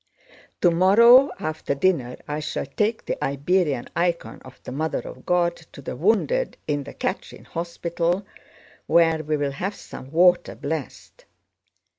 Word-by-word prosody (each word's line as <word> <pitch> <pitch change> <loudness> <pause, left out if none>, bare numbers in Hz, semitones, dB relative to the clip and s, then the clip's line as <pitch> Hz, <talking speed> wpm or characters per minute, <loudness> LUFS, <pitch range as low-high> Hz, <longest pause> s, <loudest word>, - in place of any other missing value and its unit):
Tomorrow 215 +10 +6
after 155 -2 -3
dinner 140 -6 +1
I 150 0 -3
shall 150 -2 -3
take 210 - -1
the - - -3
Iberian 145 -1 0
icon 170 0 -1
of 130 0 -14
the - - -7
Mother 155 +4 -2
of - - -11
God 175 -1 +2 0.2
to - - -11
the 135 - -6
wounded 225 - +1
in 145 -2 -1
the - - -9
Catherine - - -4
Hospital 170 +2 -2 0.6
where 165 -2 +3
we 155 0 -1
will 145 -1 -1
have 190 +9 -4
some 130 - -11
water 175 +3 +3
blessed. 150 -1 -6
170 Hz, 140 wpm, -23 LUFS, 145-185 Hz, 0.6 s, Tomorrow